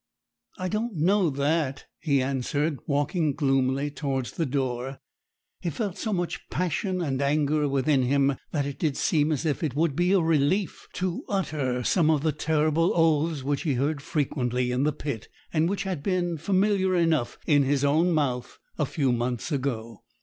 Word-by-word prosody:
'I 185 -2 -2
don't 215 +1 -2
know 180 +3 +3
that,' 140 0 -1
he 140 -4 +1
answered, 140 +2 -1
walking 145 +1 0
gloomily 135 0 +1
towards 135 -4 -2
the 165 - -2
door. 130 -1 -2 0.6
He 170 - -2
felt 190 - -3
so 215 +2 -3
much 175 -3 -3
passion 185 +1 -1
and 135 -3 -1
anger 150 +1 +2
within 135 0 +2
him, 140 +2 +2 0.2
that 145 -3 0
it 140 -1 -5
did 150 -4 0
seem 155 -1 +2
as 155 +2 -1
if 150 -3 0
it 150 -6 -2
would 155 -2 +1
be 175 +3 +2
a 195 - +5
relief 165 +4 +1
to 185 -1 -2
utter 145 -10 -1
some 160 +4 +3
of 150 -3 +2
the 160 - +2
terrible 155 +2 +1
oaths 160 -3 +2
which 140 0 -1
he 145 -5 0
heard 140 +3 0
frequently 125 -5 -1
in 125 +3 +1
the 150 - +3
pit, 140 -6 -5 0.3
and 160 +1 +2
which 195 0 -1
had 185 -6 -3
been 175 -1 0
familiar 190 +2 +2
enough 165 -8 +1
in 145 -2 +4
his 140 0 +1
own 160 +5 +3
mouth 130 -6 -1 0.2
a 150 - +1
few 135 -3 0
months 120 +4 -2
ago. 115 -6 -3
150 Hz, 175 wpm, -26 LUFS, 135-170 Hz, 0.6 s, a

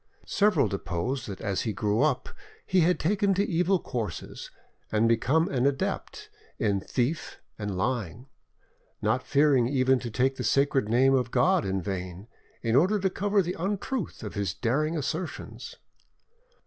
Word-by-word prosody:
Several 200 -8 +3
deposed 100 +8 -3
that 100 -2 -7
as 100 -1 -1
he 110 - -2
grew 105 +4 0
up 145 -4 +1 0.4
he 185 - +2
had 175 +1 +3
taken 200 +3 +1
to 200 +2 +2
evil 180 +2 +1
courses, 110 - -5 0.4
and 110 +1 +3
become 135 +8 +2
an 130 0 +1
adept 140 -1 -3 0.3
in 100 -2 +1
theft 130 +10 -2 0.2
and 105 -3 -3
lying, 110 0 -2 0.7
not - - +1
fearing 140 -4 +3
even 130 -1 +2
to 120 - -5
take 130 +4 0
the - - -3
sacred 135 -5 +2
name 130 +4 +4
of 125 -3 +1
God 185 +6 +3
in 95 -1 -1
vain, 95 +1 -5 0.4
in 115 0 +1
order 185 +9 +4
to 190 -1 0
cover 200 +1 +1
the 175 +1 -3
untruth 200 - -3
of 105 - -6
his 100 -3 -2
daring 150 +10 0
assertions. 160 +5 -5
130 Hz, 155 wpm, -27 LUFS, 110-170 Hz, 0.7 s, name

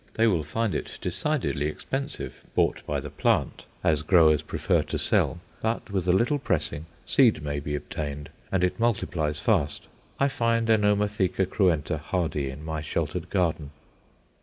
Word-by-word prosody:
They 115 - +3
will 90 -9 +2
find 110 +7 -1
it - - -4
decidedly 95 - -1
expensive 135 - -5
bought - - +2
by - - 0
the - - -7
plant, - - 0 0.2
as 75 -2 +3
growers 80 -2 +5
prefer - - 0
to - - -3
sell. 85 - +2 0.2
But, 110 -2 -2
with 95 -3 -1
a - - +5
little 120 +10 +2
pressing 80 - -1 0.2
seed 115 - +4
may 70 -1 -2
be 75 +1 -3
obtained, 75 -2 -5 0.2
and 95 -2 +1
it 90 - 0
multiplies 85 -10 0
fast. 80 -7 0 0.3
I 140 - +4
find 115 -3 +1
Anomatheca 105 -3 +2
cruenta 85 -6 +1
hardy 75 -4 -1
in 75 +4 -8
my 80 -1 -3
sheltered 80 +2 -3
garden. 80 -6 0
90 Hz, 155 wpm, -26 LUFS, 75-110 Hz, 0.3 s, growers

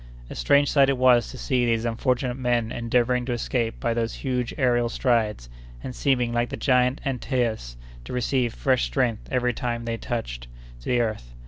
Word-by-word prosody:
A - - -6
strange 140 - +3
sight 140 -2 +5
it 135 - +1
was 125 -2 +4
to 130 - -9
see 125 0 0
these 115 -1 +1
unfortunate 125 +2 0
men 120 -3 0
endeavoring 125 +1 +1
to 125 - 0
escape 120 -1 -2
by 115 - 0
those 115 -1 -2
huge 125 -3 -2
aërial 120 -2 +2
strides, 115 - 0 0.4
and 125 - -6
seeming, 125 -3 +1
like 120 0 0
the - - -5
giant 125 -1 +2
Antaeus, 120 - -2 0.3
to - - -8
receive 125 0 0
fresh 130 -2 +1
strength 120 -5 -1
every 125 -1 +1
time 120 -1 -3
they 115 0 -2
touched - - -5 0.4
the 125 - +1
earth. 105 - -4
120 Hz, 180 wpm, -25 LUFS, 115-125 Hz, 0.4 s, sight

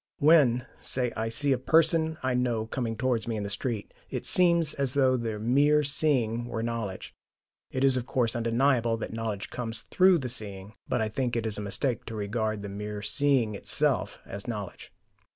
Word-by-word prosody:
When, 140 -6 +4 0.2
say, 125 -2 -1
I 110 0 -2
see 140 +5 +1
a 130 - +2
person 160 +2 +3
I 130 -1 +1
know 120 -3 0
coming 115 -1 -3
towards 120 -2 0
me 115 - -2
in 105 - -3
the 100 - -4
street, 115 -5 -4 0.2
it - - -4
SEEMS 170 -4 +4
as 140 -1 -1
though 130 -2 +4
the 115 -3 -3
mere 145 +7 +3
seeing 130 -6 +1
were 115 -1 -3
knowledge. 115 -5 -4 0.6
It 130 - -2
is 135 -1 +4
of 125 0 -4
course 120 -2 0
undeniable 115 0 +1
that 115 - -6
knowledge 110 -3 -4
comes 115 -2 -5
THROUGH 185 -1 +4
the 130 -5 -4
seeing, 105 -3 -4 0.2
but 125 - 0
I 110 - +1
think 120 +2 -2
it 115 -1 -1
is 105 -2 -2
a - - -4
mistake 115 +4 -1
to 115 - -6
regard 110 0 -2
the - - -5
mere 105 +1 -6
seeing 130 -2 +2
itself 100 - 0
as 100 +4 -8
knowledge. 105 -5 -6
120 Hz, 190 wpm, -28 LUFS, 110-135 Hz, 0.6 s, When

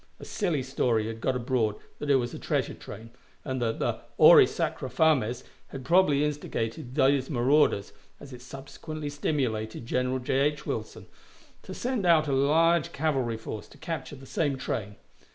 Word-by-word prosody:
A - - -9
silly 170 - -1
story 120 -4 0
had 115 0 -6
got 130 - 0
abroad 120 -3 0 0.2
that 145 - -4
it 140 - +5
was 120 -2 0
a - - -7
treasure - - -1
train, 115 +1 -11 0.3
and 130 -2 -3
the 115 -1 -1 0.2
auri - - +8
sacra - - -3
fames 130 -7 +2 0.2
had 135 -2 -9
probably 165 -4 +4
instigated 125 -4 -3
these 135 -2 +3
marauders, 130 -5 +2 0.3
as 140 -2 -11
it 125 - -10
subsequently 140 +4 -7
stimulated 120 -7 -2
General 125 +2 0
J. 130 +1 -1
H. 145 +1 0
Wilson, - - -5 0.6
to - - -9
send 245 -7 -1
out 160 -3 +5
a 140 - 0
large 160 +4 +3
cavalry 135 -6 -1
force 110 -1 -7
to - - -17
capture 160 -1 -5
the 135 0 -13
same 140 0 -1
train. 105 -5 -4
135 Hz, 165 wpm, -27 LUFS, 120-150 Hz, 0.6 s, auri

